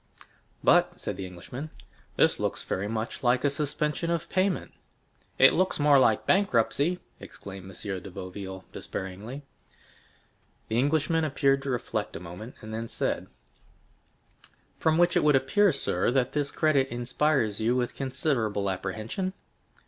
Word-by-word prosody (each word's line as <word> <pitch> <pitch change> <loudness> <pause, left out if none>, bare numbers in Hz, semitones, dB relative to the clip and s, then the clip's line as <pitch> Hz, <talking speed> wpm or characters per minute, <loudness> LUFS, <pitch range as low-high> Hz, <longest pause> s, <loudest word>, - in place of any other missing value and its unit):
"But," - - +4
said - - -4
the 95 - -5
Englishman, 120 - -8 0.5
"this - - +3
looks - - -2
very 95 +2 -2
much 110 +1 -3
like 125 0 +2
a 145 - +3
suspension 150 +3 -1
of 170 -2 -1
payment." 185 0 0 0.7
"It 135 - +7
looks 185 -2 +1
more 145 -1 +6
like 110 -4 +3
bankruptcy!" 175 - +2 0.2
exclaimed 95 -1 -10
M. 95 0 -5
de 100 - -9
Boville 95 +1 -7
despairingly. 105 +9 -6 1.3
The 110 +2 +1
Englishman 160 +4 +2
appeared 135 -2 +2
to 135 - -4
reflect 125 -2 -2
a - - -4
moment, 90 +8 -9
and 110 0 -8
then 115 +1 -3
said, - - -2 1.5
"From 160 0 +3
which 175 0 +4
it - - +3
would 150 -1 +5
appear, 185 +10 +4
sir, 95 - 0
that 130 0 +1
this 145 -1 0
credit 145 -4 +2
inspires 120 -2 0
you 115 +3 +2
with 125 -1 0
considerable 125 -7 0
apprehension?" 110 - -3
130 Hz, 140 wpm, -28 LUFS, 105-150 Hz, 1.5 s, It